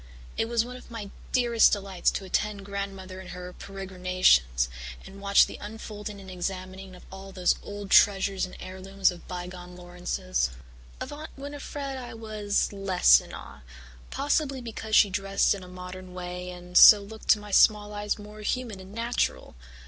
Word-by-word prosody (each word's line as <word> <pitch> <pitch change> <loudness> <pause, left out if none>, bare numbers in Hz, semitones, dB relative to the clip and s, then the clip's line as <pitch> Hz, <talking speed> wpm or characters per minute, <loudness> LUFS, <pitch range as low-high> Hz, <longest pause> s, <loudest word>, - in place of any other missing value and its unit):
It 225 - -1
was 235 -1 +1
one 250 +1 -8
of - - -15
my 215 -4 -7 0.2
dearest 240 -3 +4
delights 195 -3 0
to 195 - -4
attend 200 +1 -1
Grandmother 195 -2 -6
in 185 - -11
her 180 0 -8
peregrinations 185 - +1 0.4
and 200 +1 -12
watch 200 0 +6
the - - -9
unfolding 210 -1 -7
and 190 -1 -10
examining 185 +1 -5
of 180 - -15
all 190 0 -9
those 185 -2 +2
old 205 -1 -8
treasures 195 -1 +4
and - - -12
heirlooms 190 +1 -1
of 175 -1 -12
bygone 180 0 -7
Laurances. 175 - -2 0.5
Of - - -6
Aunt 305 +2 -8
Winnifred 280 -1 -6
I 245 -3 -8
was 215 -2 -1
less 185 - +5
in - - -13
awe, 70 +1 -10 0.5
possibly 285 -2 0
because 220 -2 -3
she 200 - +6
dressed 195 +1 +2
in 200 - -6
a - - -11
modern 180 0 -9
way 180 0 -6
and 180 0 -11
so 210 - +11
looked 220 +2 -11
to 215 - +5
my 210 0 -10
small 210 +1 +4
eyes 205 0 -2
more 210 0 -11
human 225 -2 -3
and 190 +1 -12
natural. 230 - -1
195 Hz, 170 wpm, -27 LUFS, 180-215 Hz, 0.5 s, so